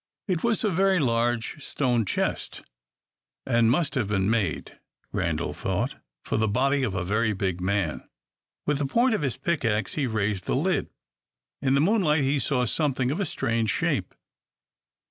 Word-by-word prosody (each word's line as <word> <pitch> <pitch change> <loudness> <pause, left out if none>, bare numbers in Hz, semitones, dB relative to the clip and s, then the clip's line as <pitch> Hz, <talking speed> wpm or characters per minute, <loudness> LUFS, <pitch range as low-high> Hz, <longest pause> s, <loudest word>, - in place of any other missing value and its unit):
It 180 -4 -1
was 235 -1 +2
a 210 - +2
very 190 +2 +3
large 120 0 0
stone 120 -5 0
chest, - - -2 0.8
and 115 -3 +3
must 150 +3 +1
have 125 -7 0
been 100 0 +1
made, 105 -8 -2 0.3
Randal - - -1
thought, - - -2 0.3
for - - -1
the 110 0 +2
body 135 +6 +2
of 110 -7 -1
a 90 - -1
very 110 +4 +1
big 95 -2 -2
man. 95 -4 -1 0.6
With 145 -1 +1
the 145 - 0
point 235 - +3
of 215 - 0
his 135 -3 -1
pickaxe 125 -8 0
he 145 -4 0
raised 105 -5 -1
the - - 0
lid. - - 0 0.7
In 135 +1 +2
the 140 - +3
moonlight 160 -5 +3
he 140 +2 +1
saw 125 0 +1
something 130 -1 0
of 155 - -2
a 200 - +1
strange 115 -1 0
shape. - - -1
125 Hz, 165 wpm, -26 LUFS, 110-150 Hz, 0.8 s, very